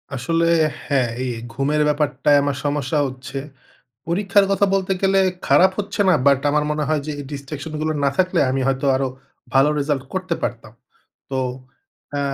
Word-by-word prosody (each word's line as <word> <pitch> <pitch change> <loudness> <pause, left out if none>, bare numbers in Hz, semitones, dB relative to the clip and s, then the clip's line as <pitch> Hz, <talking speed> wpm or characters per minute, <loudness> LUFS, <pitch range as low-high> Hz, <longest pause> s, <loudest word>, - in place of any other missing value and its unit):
আসলে 165 +6 0 0.4
হ্যাঁ, 130 -5 +1
এই 130 - -2 0.2
ঘুমের 145 +4 0
ব্যাপারটায় 145 -1 +2
আমার 145 -2 -1
সমস্যা 145 0 0
হচ্ছে। 130 +1 -8 0.7
পরীক্ষার 200 +3 +3
কথা 200 +1 +3
বলতে 190 0 0
গেলে 195 0 +4 0.3
খারাপ 190 +1 +5
হচ্ছে 205 - -3
না, 180 - +6
বাট 140 -1 +5
আমার 150 0 +1
মনে 150 0 -1
হয় 155 -1 +1
যে - - -3
এই 145 - -6
distraction 145 +2 -6
গুলো 155 0 0
না 140 - +3
থাকলে 185 -1 +2
আমি 135 +1 0
হয়তো 135 +1 0
আরও 135 0 0 0.5
ভালো 135 +3 +5
রেজাল্ট 140 -2 -1
করতে 185 -2 -1
পারতাম। 115 -2 -4 0.6
তো 135 - -1 0.8
আ - - 0
145 Hz, 165 wpm, -21 LUFS, 135-170 Hz, 0.8 s, না